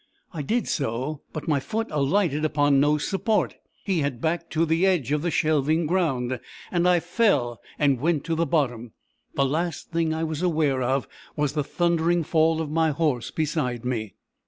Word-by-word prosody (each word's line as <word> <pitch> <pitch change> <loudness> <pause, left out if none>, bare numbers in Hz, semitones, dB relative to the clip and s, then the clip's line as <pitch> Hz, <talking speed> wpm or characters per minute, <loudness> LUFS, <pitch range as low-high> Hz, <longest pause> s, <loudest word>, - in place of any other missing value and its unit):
I 160 - -3
did 225 - -1
so; 135 +2 -2
but 155 - -6
my 150 -3 +2
foot 225 +11 -2
alighted 150 +1 +1
upon 145 -2 +3
no 150 +2 +3
support. 195 +7 0 0.3
He 190 -4 0
had 140 -5 -2
backed 165 +3 -2
to 160 +1 +2
the 165 +2 +1
edge 180 -9 +2
of 150 0 +1
the 175 - 0
shelving 155 +1 +2
ground, 135 -8 0 0.3
and 175 0 +2
I 175 -1 +4
fell, 165 - +1 0.2
and 140 -4 +2
went 155 -2 +1
to 165 - -2
the 165 +1 0
bottom. 125 -8 -1 0.4
The 140 - +2
last 160 +4 -2
thing 165 -1 +1
I 160 +1 -1
was 160 -1 -3
aware 155 -7 +1
of, 130 +1 0 0.3
was 150 -2 0
the 150 -1 0
thundering 170 +1 +1
fall 160 +1 +2
of 155 -2 -4
my 160 0 +2
horse 145 -5 0
beside 145 -7 -2
me. 110 -5 -3
155 Hz, 180 wpm, -25 LUFS, 140-170 Hz, 0.4 s, I